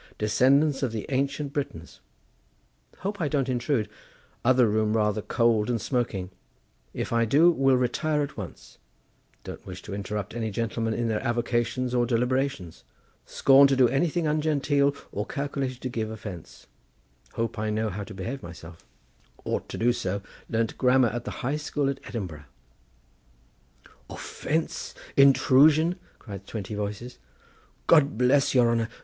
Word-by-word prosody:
descendants 135 Hz, +7 st, +3 dB
of 130 Hz, -4 st, 0 dB
the 110 Hz, -2 st, -4 dB
Ancient 140 Hz, +1 st, -1 dB
Britons—Hope 145 Hz, -, -9 dB
I 155 Hz, -, +1 dB
don't 140 Hz, -3 st, 0 dB
intrude—other 125 Hz, 0 st, -1 dB
room 110 Hz, +1 st, +1 dB
rather 105 Hz, 0 st, +1 dB
cold 115 Hz, -1 st, +1 dB
and 120 Hz, -2 st, 0 dB
smoking—If 95 Hz, -, -5 dB
I 115 Hz, 0 st, +3 dB
do 150 Hz, +10 st, +5 dB
will 135 Hz, -4 st, +3 dB
retire 150 Hz, +5 st, 0 dB
at 145 Hz, -, -6 dB
once—don't 100 Hz, -6 st, -12 dB
wish 90 Hz, -1 st, -9 dB
to -, -, -7 dB
interrupt 100 Hz, 0 st, -4 dB
any 115 Hz, -1 st, -2 dB
gentlemen 115 Hz, +1 st, -2 dB
in 120 Hz, -1 st, -1 dB
their 110 Hz, -2 st, -1 dB
avocations 120 Hz, +1 st, -1 dB
or 120 Hz, -1 st, +2 dB
deliberations—scorn 130 Hz, -, +1 dB
to 135 Hz, -, +2 dB
do 130 Hz, -2 st, +5 dB
anything 165 Hz, +4 st, 0 dB
ungenteel 145 Hz, -2 st, +1 dB, 0.2 s
or 105 Hz, +3 st, -3 dB
calculated 140 Hz, -2 st, -3 dB
to 130 Hz, -, -3 dB
give 110 Hz, -3 st, -3 dB
offence—hope 95 Hz, -, -8 dB
I 110 Hz, 0 st, -1 dB
know 110 Hz, +1 st, 0 dB
how 100 Hz, +2 st, -5 dB
to 100 Hz, +1 st, -10 dB
behave 120 Hz, +8 st, -5 dB
myself—ought 85 Hz, -1 st, -9 dB
to -, -, -5 dB
do 120 Hz, +2 st, +3 dB
so—learnt 100 Hz, +3 st, -4 dB
grammar 125 Hz, -1 st, +4 dB
at 120 Hz, +2 st, -5 dB
the -, -, -4 dB
High 140 Hz, +4 st, 0 dB
School 145 Hz, -2 st, -1 dB
at 135 Hz, -, -7 dB
Edinburgh." 85 Hz, -10 st, -6 dB, 1.6 s
"Offence, 160 Hz, +2 st, -3 dB, 0.2 s
intrusion!" 150 Hz, +5 st, +5 dB, 0.2 s
cried 100 Hz, -4 st, -10 dB
twenty 105 Hz, -1 st, -5 dB
voices. 105 Hz, +4 st, -5 dB, 0.7 s
"God 145 Hz, -8 st, +4 dB
bless 135 Hz, +3 st, +3 dB
your 120 Hz, -2 st, +5 dB
honour! 115 Hz, -1 st, 0 dB
120 Hz, 130 wpm, -26 LUFS, 105-140 Hz, 1.6 s, do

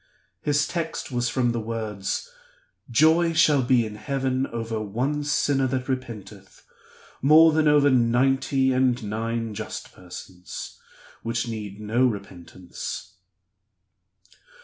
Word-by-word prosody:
His 145 Hz, +2 st, +1 dB
text 165 Hz, -4 st, -4 dB
was 120 Hz, -1 st, 0 dB
from 125 Hz, -2 st, +1 dB
the 115 Hz, -, -2 dB
words, 110 Hz, -3 st, -3 dB, 0.6 s
'Joy 160 Hz, +7 st, +4 dB
shall 150 Hz, -3 st, +4 dB
be 120 Hz, -2 st, +3 dB
in 105 Hz, -1 st, -7 dB
heaven 135 Hz, 0 st, -1 dB
over 115 Hz, -1 st, -4 dB
one 130 Hz, +8 st, -2 dB
sinner 140 Hz, -2 st, +1 dB
that 130 Hz, 0 st, -2 dB
repenteth, 105 Hz, -7 st, -6 dB, 0.6 s
more 155 Hz, +4 st, +7 dB
than 155 Hz, 0 st, +2 dB
over 145 Hz, -1 st, +5 dB
ninety 130 Hz, +2 st, +2 dB
and 125 Hz, -2 st, +2 dB
nine 115 Hz, +1 st, -3 dB
just -, -, -7 dB
persons, 90 Hz, 0 st, -9 dB, 0.4 s
which 115 Hz, +1 st, -2 dB
need 105 Hz, -3 st, -6 dB
no 115 Hz, +5 st, +2 dB
repentance. 95 Hz, -5 st, -7 dB
120 Hz, 115 wpm, -25 LUFS, 110-135 Hz, 0.6 s, more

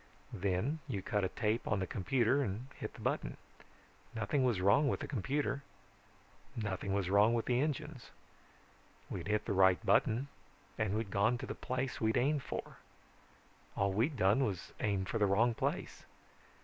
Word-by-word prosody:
Then 100 Hz, -, -1 dB
you 95 Hz, -2 st, -3 dB
cut 105 Hz, 0 st, 0 dB
a 95 Hz, -, +1 dB
tape 110 Hz, +4 st, -1 dB
on 110 Hz, -, +1 dB
the 95 Hz, -, -1 dB
computer 125 Hz, +7 st, +1 dB
and 120 Hz, +2 st, -3 dB
hit -, -, -6 dB
the -, -, -11 dB
button. -, -, -2 dB, 0.8 s
Nothing 115 Hz, +5 st, 0 dB
was 120 Hz, -7 st, +2 dB
wrong 100 Hz, +11 st, +4 dB
with -, -, 0 dB
the -, -, -4 dB
computer. 140 Hz, +3 st, -1 dB, 0.9 s
Nothing 100 Hz, -3 st, -3 dB
was 100 Hz, -2 st, 0 dB
wrong 105 Hz, +4 st, +5 dB
with 115 Hz, -, -1 dB
the 125 Hz, 0 st, +2 dB
engines. 150 Hz, -3 st, -3 dB, 1.0 s
We'd -, -, -4 dB
hit 105 Hz, 0 st, 0 dB
the -, -, -1 dB
right 95 Hz, +2 st, +4 dB
button 115 Hz, +6 st, +3 dB, 0.5 s
and 105 Hz, -2 st, 0 dB
we'd 110 Hz, -3 st, -3 dB
gone 105 Hz, +6 st, +2 dB
to -, -, -6 dB
the -, -, -4 dB
place 130 Hz, +1 st, -3 dB
we'd 110 Hz, 0 st, +2 dB
aimed 145 Hz, +3 st, +2 dB
for. -, -, -6 dB, 1.0 s
All 100 Hz, 0 st, +1 dB
we'd 125 Hz, +8 st, +1 dB
done 105 Hz, +6 st, +4 dB
was 100 Hz, -7 st, -3 dB
aim 100 Hz, -3 st, 0 dB
for 115 Hz, -, -2 dB
the 105 Hz, -, +4 dB
wrong 115 Hz, +5 st, +3 dB
place. -, -, -3 dB
110 Hz, 170 wpm, -34 LUFS, 100-130 Hz, 1.0 s, wrong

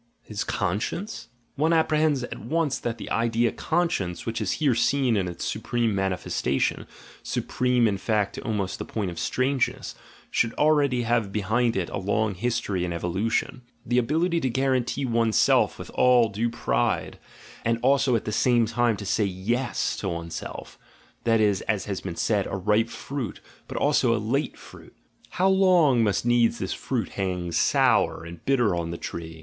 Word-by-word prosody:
His 105 Hz, 0 st, -4 dB
conscience? 105 Hz, -, -3 dB
— 115 Hz, -, -41 dB
One 165 Hz, +1 st, +3 dB
apprehends 155 Hz, -4 st, +2 dB
at -, -, -6 dB
once 150 Hz, +3 st, -1 dB
that 115 Hz, -1 st, -3 dB
the -, -, -8 dB
idea 115 Hz, 0 st, +1 dB
"conscience," 160 Hz, -, -1 dB
which 115 Hz, 0 st, -3 dB
is -, -, 0 dB
here 145 Hz, -5 st, +2 dB
seen 130 Hz, 0 st, +2 dB
in 95 Hz, -3 st, 0 dB
its 85 Hz, -, -5 dB
supreme 120 Hz, -3 st, -1 dB
mani 95 Hz, -1 st, 0 dB
festation, 70 Hz, -6 st, -1 dB, 0.3 s
supreme 125 Hz, -2 st, +1 dB
in 100 Hz, -2 st, -1 dB
fact 105 Hz, -1 st, 0 dB
to -, -, -7 dB
almost 105 Hz, -6 st, -2 dB
the -, -, -3 dB
point 100 Hz, -5 st, -3 dB
of 85 Hz, -, -7 dB
strange 130 Hz, 0 st, +1 dB
ness, -, -, -9 dB, 0.4 s
should 115 Hz, 0 st, +1 dB
already 145 Hz, -5 st, +3 dB
have 115 Hz, -3 st, 0 dB
behind 110 Hz, +4 st, +1 dB
it 95 Hz, -3 st, -1 dB
a -, -, -3 dB
long 105 Hz, +2 st, 0 dB
history 105 Hz, -2 st, -1 dB
and 85 Hz, -1 st, -2 dB
evolution. 100 Hz, +9 st, -1 dB, 0.2 s
The 125 Hz, 0 st, +2 dB
ability 165 Hz, +7 st, +1 dB
to 130 Hz, -, -1 dB
guarantee 130 Hz, +1 st, 0 dB
one's 115 Hz, -3 st, +1 dB
self -, -, +3 dB
with -, -, -9 dB
all 125 Hz, -3 st, +4 dB
due 110 Hz, +4 st, -1 dB
pride, 60 Hz, -, -1 dB, 0.4 s
and 115 Hz, 0 st, +1 dB
also 135 Hz, -1 st, +3 dB
at 115 Hz, -, -1 dB
the 105 Hz, -, -2 dB
same 120 Hz, +1 st, +3 dB
time 115 Hz, 0 st, +1 dB
to 100 Hz, -, -7 dB
say 105 Hz, +2 st, +1 dB
yes 105 Hz, +7 st, -1 dB
to 95 Hz, -, -3 dB
one's 85 Hz, -1 st, -5 dB
self -, -, -7 dB, 0.2 s
— -, -, -32 dB
that 115 Hz, -1 st, +3 dB
is, 105 Hz, -3 st, +2 dB
as 105 Hz, -4 st, 0 dB
has 100 Hz, -3 st, -4 dB
been 90 Hz, -3 st, -5 dB
said, 105 Hz, 0 st, 0 dB
a 100 Hz, -, -3 dB
ripe 105 Hz, +4 st, +1 dB
fruit, 130 Hz, -5 st, -5 dB, 0.3 s
but -, -, -6 dB
also 135 Hz, -5 st, +3 dB
a -, -, 0 dB
late 120 Hz, +8 st, -1 dB
fruit: -, -, -15 dB, 0.2 s
— -, -, -27 dB
How 185 Hz, -, +3 dB
long 180 Hz, -10 st, +4 dB
must 105 Hz, +1 st, 0 dB
needs 120 Hz, -1 st, +3 dB
this 95 Hz, -, -3 dB
fruit 120 Hz, -7 st, -3 dB
hang 90 Hz, -3 st, -3 dB
sour 85 Hz, -, +2 dB
and 85 Hz, -1 st, -10 dB
bitter 125 Hz, -7 st, +2 dB
on 85 Hz, -1 st, -2 dB
the 85 Hz, -, -4 dB
tree! 80 Hz, -1 st, -7 dB
115 Hz, 185 wpm, -25 LUFS, 100-130 Hz, 0.4 s, all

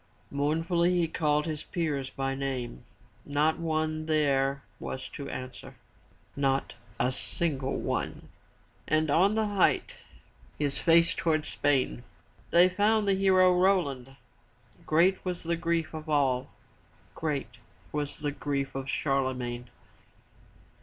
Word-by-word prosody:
Mourn 145 Hz, +3 st, 0 dB
fully 175 Hz, +1 st, +2 dB
he 170 Hz, -1 st, +2 dB
called 150 Hz, -2 st, +1 dB
his 155 Hz, -2 st, -4 dB
peers 145 Hz, -6 st, -2 dB
by 135 Hz, 0 st, -2 dB
name. 130 Hz, -, -4 dB, 0.4 s
Not 150 Hz, +3 st, +1 dB
one 155 Hz, -1 st, -1 dB
there 140 Hz, -3 st, +1 dB, 0.2 s
was 130 Hz, -, -5 dB
to 140 Hz, -, -7 dB
answer, 130 Hz, 0 st, -7 dB, 0.3 s
— -, -, -33 dB
not 135 Hz, 0 st, -1 dB, 0.3 s
a 125 Hz, +2 st, +2 dB
single 135 Hz, -1 st, -2 dB
one. -, -, -3 dB, 0.6 s
And 155 Hz, -1 st, +2 dB
on 190 Hz, +7 st, +4 dB
the 220 Hz, 0 st, +2 dB
height, 205 Hz, -3 st, +1 dB, 0.6 s
his 145 Hz, -2 st, 0 dB
face 170 Hz, 0 st, +5 dB
toward 155 Hz, -2 st, 0 dB
Spain, 130 Hz, -, 0 dB, 0.5 s
they 175 Hz, +2 st, +6 dB
found 205 Hz, +3 st, +2 dB
the 200 Hz, -, +4 dB
hero 185 Hz, -1 st, +4 dB
Roland. 145 Hz, -9 st, +1 dB, 0.7 s
Great 175 Hz, +5 st, +3 dB
was 180 Hz, -2 st, -3 dB
the 170 Hz, +1 st, 0 dB
grief 165 Hz, -1 st, -1 dB
of 155 Hz, 0 st, -7 dB
all. 135 Hz, -4 st, +1 dB, 0.6 s
Great 140 Hz, -7 st, -3 dB, 0.3 s
was 145 Hz, -1 st, -3 dB
the 145 Hz, -1 st, -2 dB
grief 140 Hz, -1 st, -3 dB
of 135 Hz, 0 st, -5 dB
Charlemagne. 130 Hz, -4 st, -1 dB
150 Hz, 125 wpm, -29 LUFS, 135-170 Hz, 0.7 s, they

